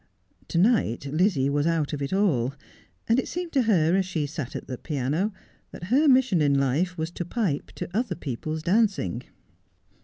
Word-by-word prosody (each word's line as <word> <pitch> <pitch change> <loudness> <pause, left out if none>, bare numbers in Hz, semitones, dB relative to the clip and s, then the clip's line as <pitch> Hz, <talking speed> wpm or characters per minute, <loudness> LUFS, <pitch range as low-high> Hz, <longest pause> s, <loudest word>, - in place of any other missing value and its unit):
To - - -2
night 180 - +2
Lizzie 155 -1 +1
was 145 +2 +1
out 160 -3 0
of 145 - -3
it 140 - -3
all: 140 - +1 0.5
and 230 +3 +3
it - - -2
seemed 350 -1 -4
to 270 - +3
her, 180 -7 +3
as 195 - +3
she 175 -5 -2
sat 145 -3 -6
at - - -5
the 130 -2 -6
piano, 150 - -1 0.4
that 180 +7 -6
her 300 +4 +5
mission 255 - +4
in 140 -1 +3
life 155 +7 0
was 160 +1 -3
to 175 - -4
pipe 175 -5 -2
to - - -5
other 225 -5 0
people's 155 +2 -4
dancing. 185 - +1
170 Hz, 185 wpm, -26 LUFS, 145-205 Hz, 0.5 s, her